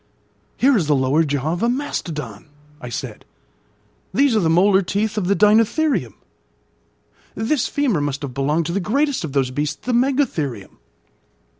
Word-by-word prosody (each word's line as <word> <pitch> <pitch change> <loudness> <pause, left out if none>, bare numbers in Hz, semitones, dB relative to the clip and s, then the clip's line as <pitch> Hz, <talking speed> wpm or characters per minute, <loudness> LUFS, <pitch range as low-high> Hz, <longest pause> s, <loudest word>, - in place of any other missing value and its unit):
"Here 270 +1 +4
is 175 -9 +1
the 150 - +3
lower 135 +4 +2
jaw 145 +1 -1
of 175 - -4
a 235 - +2
mastodon," 150 - -4 0.3
I 125 - -7
said. 120 - -6 0.9
"These 270 +2 +2
are - - +4
the 165 -5 +1
molar 190 +4 +4
teeth 205 +4 -2
of 205 -4 -1
the 200 - +2
deinotherium; 215 - +2 1.2
this 245 +5 0
femur 255 - 0
must 145 0 -3
have 135 -3 -5
belonged 145 +5 0
to 170 - -3
the 200 - 0
greatest 275 +8 0
of 150 -4 -5
those 135 -3 0
beasts, 150 +3 -2
the 250 - -1
megatherium. 235 - -1
175 Hz, 160 wpm, -20 LUFS, 145-235 Hz, 1.2 s, Here